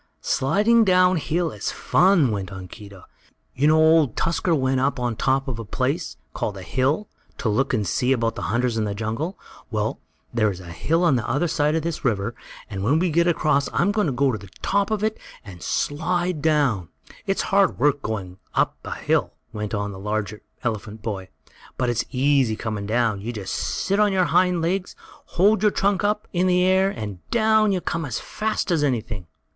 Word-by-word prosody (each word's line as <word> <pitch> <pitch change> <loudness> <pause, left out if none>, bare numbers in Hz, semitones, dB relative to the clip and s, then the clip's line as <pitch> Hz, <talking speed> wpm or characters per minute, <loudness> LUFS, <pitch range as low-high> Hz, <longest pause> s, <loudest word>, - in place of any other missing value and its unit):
"Sliding 215 - +3
down 185 -2 +4
hill 165 +2 -1
is - - -4
fun," 175 - +3
went 100 -3 -3
on 95 -1 -8
Keedah. 100 -1 -12 0.5
"You 140 +3 +2
know 155 +1 +5
Old 160 -5 +4
Tusker 165 0 +1
went 130 -2 +1
up 135 +2 +1
to 125 - -4
the 120 - -2
top 135 +4 +1
of 120 -3 -4
a - - -4
place, 100 - -2 0.2
called 100 - -3
a 95 - -8
hill, 135 - 0 0.3
to - - -2
look 130 +6 +1
and 110 -5 0
see 125 +8 0
about 115 -3 +1
the - - -7
hunters 120 +1 0
in 110 - 0
the 100 -1 -3
jungle. 115 - -3 0.3
Well, - - -2 0.3
there 110 -3 +2
is 95 -3 -5
a 85 -2 -10
hill 165 - 0
on 150 -7 +4
the 115 - -3
other 145 +8 +1
side 150 -1 +1
of 160 - 0
this 170 -1 -3
river, 115 -3 0 0.3
and 95 -2 -5
when 140 +9 +3
we 175 +1 +1
get 170 +2 +3
across 155 -4 +2
I'm 190 +4 +2
going 210 -3 +1
to 135 -3 +1
the 100 -1 -12
top 200 0 +1
of 215 -1 -1
it 220 0 -1 0.3
and 90 -4 -11
slide 175 +2 -1
down. 140 - +1 0.4
"It's 195 - 0
hard 200 -1 +4
work 145 +2 +2
going 95 -4 -5 0.2
up - - +1 0.3
hill," - - +1 0.2
went 105 0 -3
on 100 0 -2
the 95 - -9
larger 105 +1 -3 0.2
elephant 110 -2 -4
boy, 95 -4 -4 0.5
"but 125 -1 +1
it's 120 0 -1
easy 135 -3 +2
coming 105 -2 -4
down. 110 -2 +1
You 115 +4 -4
just 105 -5 -5
sit 200 +1 -1
on 210 -1 +4
your 185 -2 +2
hind 180 0 +2
legs, 185 +2 -1 0.4
hold 200 +3 +4
your 215 - +5
trunk 200 -1 +1
up 210 +1 0
in 180 +1 +2
the 180 0 +3
air 190 +1 +4
and 105 - -6
down 220 -2 +3
you 185 -2 0
come 165 0 -2
as 125 -6 -3
fast 215 -3 -2
as 160 -4 +2
anything!" 115 - -2
135 Hz, 200 wpm, -23 LUFS, 110-180 Hz, 0.5 s, know